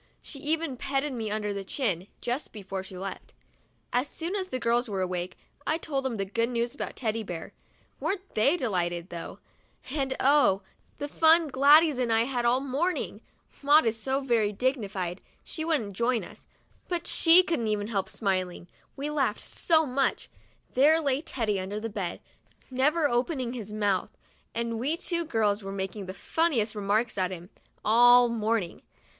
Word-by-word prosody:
She 280 - -7
even 310 -2 -1
petted 275 +2 -1
me 225 -3 -3
under 210 -1 -2
the 200 -1 -4
chin, 195 - -1
just 245 +4 -3
before 195 -2 -6
she 190 -1 -10
left. 190 0 -7 0.6
As 250 +3 +1
soon 335 +6 -4
as 380 -2 -1
the 255 - -3
girls 240 0 +1
were 195 -2 -2
awake, 180 0 -4 0.3
I 315 - +2
told 280 -4 -2
them 245 -4 -2
the 195 - -1
good 230 +4 -1
news 235 0 -1
about - - -5
Teddy 225 -2 -1
Bear. 175 -6 -7 0.5
Weren't 390 -1 -3
they 275 +11 +3
delighted, 175 - -2
though; 170 -1 -7 0.5
and 270 -2 -1
oh! 260 -9 +4 0.3
the 290 - -4
fun 320 +1 +4
Gladys 285 +2 +5
and 240 -2 0
I 225 0 +4
had 245 0 -1
all 245 +2 +3
morning! 280 +7 -2 0.4
Maud 295 +1 +5
is 225 0 +1
so 265 +5 -2
very 230 -6 +1
dignified, 200 -7 -2 0.2
she 315 - -5
wouldn't 285 -11 -1
join 235 +3 0
us, - - -13 0.4
but 350 -2 -1
even - - -27
she 340 +2 +7
couldn't 220 - -1
help 195 -4 -1
smiling, 185 -4 -2 0.3
we 290 +2 -3
laughed 270 -8 0
so 320 -2 +2
much. 270 0 -1 0.4
There 300 +5 +5
lay 280 -3 0
Teddy 225 -10 -1
under 195 +3 -4
the 225 +1 -5
bed, 195 -5 -4 0.5
never 295 +5 +2
opening 250 0 -1
his 220 -4 -6
mouth, 205 -3 0 0.5
and 230 -1 -2
we 290 +7 0
two 340 -1 -1
girls 220 -7 +1
were 195 0 -6
making 195 0 -4
the 185 - -6
funniest 265 -10 0
remarks 210 +1 0
at 185 -1 +1
him, 180 0 -9 0.3
all 245 +2 +7
morning. 220 -5 -1
235 Hz, 170 wpm, -28 LUFS, 205-285 Hz, 0.6 s, she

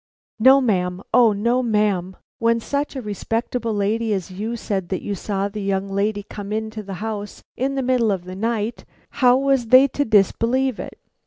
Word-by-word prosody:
"No, 265 +4 +7
ma'am, 185 -5 0
O 235 -3 +6
no, 235 +5 +1
ma'am. 210 -5 0 0.2
When 230 0 +2
such 285 +5 -3
a 260 - -5
respectable 225 +3 -2
lady 215 +2 0
as 190 -2 -3
you 215 +5 -4
said 195 -5 -3
that 190 - -3
you 205 - -3
saw 200 +1 -2
the 205 +1 -6
young 195 0 -1
lady 205 +1 -1
come 205 0 -8
into 220 0 -3
the 195 -2 -7
house 210 -2 -6
in 270 +2 -1
the 270 - -1
middle 245 -4 +2
of 190 -3 -2
the 185 0 -7
night, 225 +2 -2 0.4
how 250 0 +6
was 270 -3 +1
they 255 +4 +7
to 285 - -1
disbelieve 230 +3 +2
it. - - -7
220 Hz, 185 wpm, -21 LUFS, 200-240 Hz, 0.4 s, No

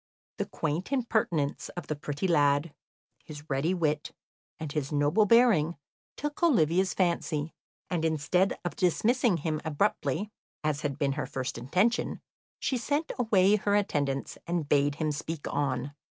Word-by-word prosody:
The - - -2
quaint 160 - -3
impertinence 215 - 0
of 175 - -4
the 155 - -3
pretty 145 +4 -3
lad, 145 -1 +3 0.5
his 150 -1 -10
ready 150 +7 +1
wit, 155 -4 -1 0.5
and 155 -2 -5
his 145 -2 -2
noble 150 +9 +3
bearing, 205 -9 +4 0.4
took 295 +2 -4
Olivia's 190 - +3
fancy, 165 -4 0 0.3
and, 175 -3 -1
instead 165 +4 +1
of 175 - -2
dismissing 215 +3 +2
him 155 0 -2
abruptly, 160 +4 0 0.3
as 150 -1 0
had 140 -3 -2
been 140 -2 +1
her 145 +1 -3
first 130 -1 -4
intention, 185 - 0 0.4
she 260 - 0
sent 290 +6 -1
away 210 -3 +4
her 205 0 +1
attendants 145 -9 -1
and 170 -3 -1
bade 145 0 +3
him 155 0 -1
speak 150 +1 -5
on. 140 -1 -1
160 Hz, 145 wpm, -29 LUFS, 145-195 Hz, 0.5 s, bearing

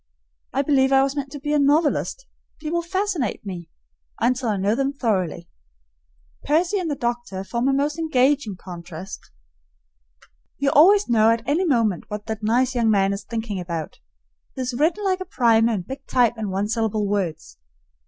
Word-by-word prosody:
I 275 - 0
believe 270 -2 +3
I 270 0 +5
was 275 +1 -1
meant 275 -2 -4
to 290 - -6
be 295 +2 -2
a 300 - +3
novelist; 300 - +1 0.3
people 325 +2 -2
fascinate 360 - -2
me 175 -4 -7 0.5
until 250 +1 +1
I 210 - 0
know 200 +2 +1
them 275 +3 0
thoroughly. 185 - -1 1.0
Percy 350 +6 +1
and 350 -3 -2
the 290 - -1
doctor 240 -6 -3
form 235 +5 -2
a 275 - +3
most 290 +3 0
engaging 275 -7 +1
contrast. 175 0 -9 1.3
You 275 0 +1
always 395 +7 +6
know 225 -2 +4
at 230 +1 0
any 320 +7 +1
moment 230 - +1
what 210 0 -6
that 220 -1 -5
nice 245 +4 +2
young 235 -3 +2
man 195 -2 +3
is 200 - -5
thinking 225 -4 -4
about; 170 -3 -5 0.6
he - - -4
is 250 0 -3
written 325 +11 +1
like 375 -1 +1
a - - -3
primer 230 -7 +3
in 200 -5 -2
big 270 +8 -9
type 245 -3 +3
and 220 -3 -4
one 195 +2 -1
syllable 220 -2 0
words. 185 -6 -3
240 Hz, 175 wpm, -23 LUFS, 210-290 Hz, 1.3 s, always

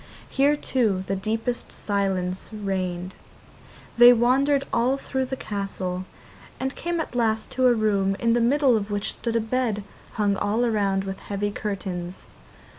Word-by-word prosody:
Here, 280 +2 +3
too, 220 -10 0
the 195 - -1
deepest 225 +5 -2
silence 190 -3 -2
reigned. 185 -3 -3 0.9
They 240 0 +10
wandered 270 +4 +3
all 250 +3 +2
through 265 -1 -2
the 265 - -4
castle, 195 -5 -4 0.5
and 265 +1 -2
came 345 0 -2
at 320 - -4
last 225 -2 0
to 255 0 +3
a 245 - +6
room 200 -3 +1
in 230 +1 +2
the 240 - +2
middle 265 +1 +4
of 210 -1 -2
which 205 0 -1
stood 230 -1 -3
a - - +4
bed 225 -2 -1 0.3
hung 205 -2 +1
all 225 +5 +1
round 200 -3 +1
with 195 0 -5
heavy 205 0 -3
curtains. 190 -4 -5
215 Hz, 155 wpm, -25 LUFS, 195-245 Hz, 0.9 s, They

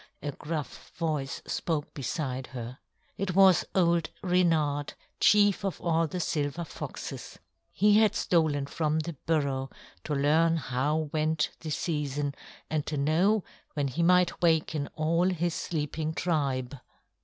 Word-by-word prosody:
a 145 - -2
gruff 150 0 -6
voice 155 -4 -2
spoke 155 -3 -2
beside 130 -1 -3
her. 125 +2 -7 0.4
It 185 -2 -2
was 190 -2 +6
old 170 -3 +3
Reynard, 160 -6 +1 0.2
chief 205 -2 +4
of 195 -2 -2
all 165 -1 +1
the 180 +4 -4
silver 150 -1 -1
foxes. 160 - -7 0.3
He 210 +1 +4
had 220 -1 +3
stolen 155 -5 +1
from 155 +2 0
the 165 +2 -5
burrow 140 -4 0 0.4
to 150 - -1
learn 160 +4 +3
how 145 +3 -1
went 155 0 +1
the 160 - -6
season 145 -3 -2 0.3
and 155 -1 -1
to 150 - -2
know 175 +9 +2 0.3
when 145 -2 0
he 135 +6 -2
might 180 0 +3
waken 160 -3 +2
all 165 +3 +2
his 175 -2 -1
sleeping 155 0 -3
tribe. 140 -7 -1
155 Hz, 135 wpm, -28 LUFS, 145-170 Hz, 0.4 s, was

